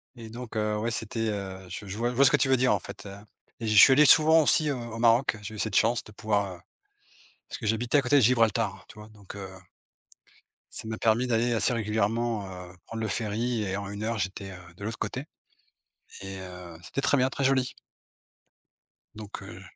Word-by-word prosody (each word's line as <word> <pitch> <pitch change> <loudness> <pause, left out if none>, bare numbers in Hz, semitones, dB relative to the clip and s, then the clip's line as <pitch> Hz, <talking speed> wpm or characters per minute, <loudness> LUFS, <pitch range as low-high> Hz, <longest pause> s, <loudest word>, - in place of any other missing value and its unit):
Et 115 -2 -10
donc 120 0 -9
heu, 105 0 0
ouais 115 +2 -2
c'était, 115 0 -2
heu, 95 -2 -5
je 100 - -7
je 100 +1 -6
vois 120 +2 0
je 125 - -5
vois 140 - +5
ce 135 - +6
que 150 - +4
tu 135 - +1
veux 130 - +4
dire, 125 -2 +3
en 100 - 0
fait, - - -10
heu 100 0 -9 0.4
et 115 - -5
je 110 - +1
suis 135 - +9
allé 150 +2 +6
souvent 160 +2 +7
aussi, 150 +1 +3
heu, 140 - 0
au 120 -2 -7
Maroc, 115 0 +3
j'ai 110 +1 -8
eu - - -8
cette 110 -3 -2
chance 115 +1 +2
de 105 - -14
pouvoir, 100 -2 -1
heu, - - -16 0.9
parce - - -7
que - - -6
j'habitais 115 +5 +1
à 140 - +3
côté 135 +3 +3
de - - +6
Gibraltar, 115 -2 +2
tu - - -14
vois? 105 +1 -11
Donc 105 -2 -13
heu 95 -1 -7 1.3
ça 110 - -6
m'a 110 - -4
permis 115 +3 +2
d'aller 120 0 +1
assez 115 +3 +1
régulièrement, 110 0 -1
heu, 90 -1 -10
prendre 115 0 -6
le 110 - -1
ferry 110 +2 -1
et 95 -1 -2
en 100 0 -5
une 105 +1 -6
heure 115 +1 -2
j'étais, 95 +1 -4
heu, 90 -2 -13
de 100 - -11
l'autre 115 +1 -4
côté 130 +3 -4 1.0
et 95 0 -7
heu, 90 -2 -10
c'était 130 - -4
très 140 - +3
bien, 130 0 +2
très 140 - -4
joli 130 -1 +1 1.4
donc 105 -2 -8
heu, 100 -1 -10
110 Hz, 225 wpm, -27 LUFS, 100-120 Hz, 1.4 s, suis